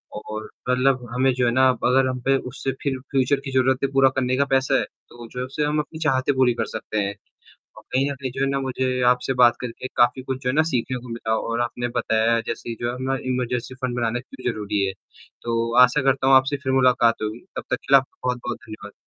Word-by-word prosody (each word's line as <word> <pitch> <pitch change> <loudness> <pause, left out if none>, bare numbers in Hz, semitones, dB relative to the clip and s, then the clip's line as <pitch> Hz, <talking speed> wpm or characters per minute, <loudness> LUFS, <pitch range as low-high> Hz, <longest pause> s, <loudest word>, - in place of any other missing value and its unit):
और 110 +1 -7 0.2
मतलब 125 -1 +2
हमें 130 +1 +3
जो 125 -1 0
है 120 - +2
ना 130 +1 +4 0.2
अगर 130 +1 +3
हम 130 0 -2
पे 135 0 +4
उससे 135 +1 -3
फिर 135 -2 -2
फ्यूचर 135 +1 +2
की 135 - -4
ज़रूरतें 130 +1 +1
पूरा 135 -1 +5
करने 130 -1 +1
का 140 - +3
पैसा 135 0 +2
है, - - 0
तो 120 -1 -13
जो 125 - -8
है 125 - -2
उससे 140 +3 -3
हम 150 +1 +1
अपनी 155 +1 -5
चाहतें 140 -2 +1
पूरी 130 -2 +3
कर - - +1
सकते 110 -1 -5
हैं। 100 +1 -2 0.6
अ, - - -11
कहीं 135 +2 +1
न - - -3
कहीं 130 -1 -5
जो 135 - -6
है - - 0
ना 140 0 -1
मुझे 130 -1 -2 0.2
आपसे 125 +1 0
बात 120 0 +6
करके 125 +1 -6
काफ़ी 120 +2 +3
कुछ 130 0 -5
जो 125 - -1
है 130 - 0
ना 155 - +4
सीखने 130 0 -1
को 125 0 -12
मिला 115 -1 -2
और 115 +1 -2
आपने 120 0 -2
बताया 115 +1 +2
जैसे 115 - -4
जो 120 0 -1
अपना 130 +1 -2 0.2
इमरजेंसी 125 0 -2
फंड 125 -1 -2
बनाना 120 +1 -1
क्यों 125 -1 -5
ज़रूरी 105 -2 -2
है। 95 - -2 0.5
तो 115 0 -1
आशा 125 +3 +4
करता 135 0 +2
हूँ 135 - +6
आपसे 135 +2 +3
फिर 130 - -1
मुलाकात 125 -4 +3
होगी, 110 +3 -4 0.2
तब - - -3
तक - - +2
के 140 - -8
लिए - - +11
आपका 135 - -18
बहुत-बहुत 120 -1 -3
धन्यवाद। 110 -1 -10
125 Hz, 240 wpm, -23 LUFS, 120-135 Hz, 0.6 s, लिए